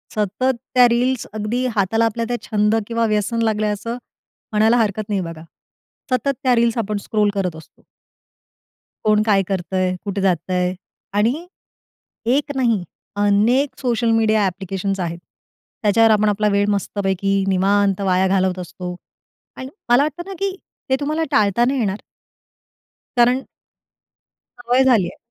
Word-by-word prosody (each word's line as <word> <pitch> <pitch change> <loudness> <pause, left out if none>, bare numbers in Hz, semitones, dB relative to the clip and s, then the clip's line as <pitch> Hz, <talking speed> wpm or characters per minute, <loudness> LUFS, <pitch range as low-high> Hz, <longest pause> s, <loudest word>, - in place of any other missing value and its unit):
सतत 215 +6 0 0.2
त्या 250 -1 +7
रील्स 250 +1 0
अगदी 220 +4 -2
हाताला 225 +3 +2
आपल्या 230 +1 -1
त्या 240 - 0
छंद 210 +1 +2
किंवा 230 -1 0
व्यसन 215 +2 0
लागलं 215 -1 +1
आहे 210 - +1
असं 230 +4 -5 0.5
म्हणायला 220 +3 +3
हरकत 215 -1 -1
नाही 200 -2 0
बघा. 165 -2 -7 0.7
सतत 255 +2 +1
त्या 250 -2 +4
रील्स 235 0 +2
आपण 210 -2 -1
स्क्रोल 210 -1 +1
करत 180 -4 -1
असतो. 160 - -15 1.2
कोण 215 0 +3
काय 200 -3 +3
करतंय, 185 -1 -1
कुठे 200 -1 -2
जातंय 180 0 0 0.4
आणि 245 +12 0 0.9
एक 290 0 -1
नाही 230 -8 +1 0.3
अनेक 230 +7 +2
सोशल 235 -2 +1
मीडिया 220 -2 +3
ॲप्लिकेशन्स 195 +1 -3
आहेत. 170 -1 -3 0.7
त्याच्यावर 225 +2 +4
आपण 210 0 +3
आपला 210 +1 +1
वेळ 200 0 +2
मस्तपैकी 195 -1 0
निवांत 195 +1 +2
वाया 190 0 +2
घालवत 185 -1 +1
असतो. 180 0 -6 0.6
आणि 260 0 -7 0.2
मला 245 +4 +5
वाटतं 310 +3 -3
ना - - -5
की 390 -1 -1 0.3
ते 265 - +4
तुम्हाला 305 +3 -1
टाळता 215 +3 +3
नाही 265 +1 0
येणार 200 -2 -2 1.2
कारण 245 +2 +4 1.2
सवय 245 +2 +2
झाली 235 -8 +4
आहे. - - -10
210 Hz, 140 wpm, -20 LUFS, 195-240 Hz, 1.2 s, त्या